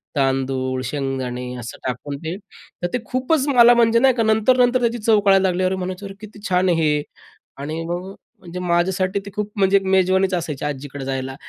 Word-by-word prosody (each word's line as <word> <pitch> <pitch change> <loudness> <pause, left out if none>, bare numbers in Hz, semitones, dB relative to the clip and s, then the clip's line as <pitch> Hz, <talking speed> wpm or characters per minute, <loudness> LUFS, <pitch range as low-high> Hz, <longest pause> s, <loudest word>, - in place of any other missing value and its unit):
तांदूळ, 130 -1 0
शेंगदाणे 130 -2 -3
असं 120 -1 -8
टाकून, 140 +3 -4
ते. 165 +3 -3 0.5
तर 175 - +2
ते 250 - 0
खूपच 260 +3 0
मला 245 -3 +6
म्हणजे 230 -1 +4
नाही 265 +1 +4
का 230 - +1
नंतर-नंतर 245 +3 +3
त्याची 235 0 0
चव 215 0 +3
कळायला 195 -1 +4
लागली. 185 0 0
अरे 185 +1 +1
म्हणायचे 185 +1 -5
अरे 195 - -7
किती 215 -1 -11
छान! 180 0 +2
आहे 165 -2 +2
हे 150 -1 +2 0.6
आणि 155 +4 -5
मग 175 +2 -4 0.3
म्हणजे 180 -1 -8
माझ्यासाठी 180 +2 0
ते 200 - -7
खूप 210 0 -3
म्हणजे 195 0 +4
एक 195 - -2
मेजवानीच 190 0 +2
असायची 160 -5 -3
आज्जीकडे 140 -1 -5
जायला 135 0 -4
185 Hz, 190 wpm, -21 LUFS, 145-210 Hz, 0.6 s, मला